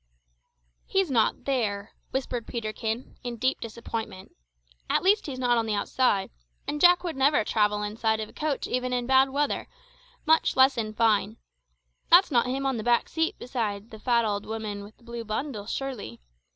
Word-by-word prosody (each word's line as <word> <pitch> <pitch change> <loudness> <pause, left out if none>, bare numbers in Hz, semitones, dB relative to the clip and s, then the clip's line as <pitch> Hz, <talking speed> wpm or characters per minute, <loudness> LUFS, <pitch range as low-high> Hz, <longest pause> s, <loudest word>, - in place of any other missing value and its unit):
"He's 385 -5 +1
not 230 -4 +1
there," 215 -7 -1 0.2
whispered 245 -3 -3
Peterkin, 220 +1 -4
in 240 -1 -4
deep 255 +3 0
disappointment 225 -4 -6 0.5
"at - - +2
least 405 +1 +3
he's 270 -3 -5
not 245 -2 +2
on 225 - -1
the 215 - 0
outside, 205 -2 +1 0.4
and 295 - -3
Jack 355 0 +6
would 340 -3 -3
never 270 -2 +3
travel 210 -1 +1
inside 220 +1 0
of 215 - -3
a - - -17
coach 300 -3 -2
even 250 0 -1
in 245 -1 0
bad 265 +1 +5
weather, 285 +2 -1 0.6
much 320 +1 +3
less 265 +1 +6
in 215 -2 -3
fine. 220 -1 +2 0.7
That's 345 0 +7
not 245 -2 +3
him 270 +2 -2
on 265 -2 0
the 220 - -4
back 240 0 +2
seat 325 0 -1
beside 220 -4 -4
the 220 - -10
fat 235 0 +2
old 205 -1 -2
woman 215 -2 -4
with 210 +2 -14
the - - -25
blue 235 0 -6
bundle, 220 -1 -4
surely! 245 - -5
235 Hz, 180 wpm, -27 LUFS, 215-265 Hz, 0.7 s, That's